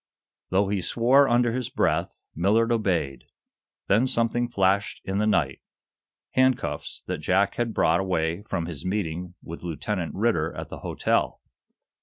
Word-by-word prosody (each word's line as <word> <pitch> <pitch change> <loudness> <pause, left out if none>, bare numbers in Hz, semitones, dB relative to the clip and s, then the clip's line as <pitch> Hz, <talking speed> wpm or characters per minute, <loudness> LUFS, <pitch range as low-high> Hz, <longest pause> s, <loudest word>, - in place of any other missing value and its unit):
Though 95 +1 +2
he 100 -2 0
swore, 130 +8 +4
under 120 0 +3
his 125 0 -2
breath, - - 0 0.2
Millard 110 +7 +2
obeyed. 90 - 0 0.6
Then 115 +6 +3
something 120 0 +1
flashed 100 -2 +1
in 95 +1 -1
the 105 - +2
night 70 -10 +1 0.7
handcuffs 130 -1 0
that - - -3
Jack 100 +2 +2
had 120 -1 -1
brought 85 -5 +2
away 85 -2 -1
from 85 -5 -3
his 80 -5 -6
meeting 90 -2 -3
with 85 - -8
Lieutenant 85 +2 -3
Ridder 95 -7 0
at - - -6
the - - -8
hotel. - - -1
100 Hz, 145 wpm, -25 LUFS, 85-115 Hz, 0.7 s, swore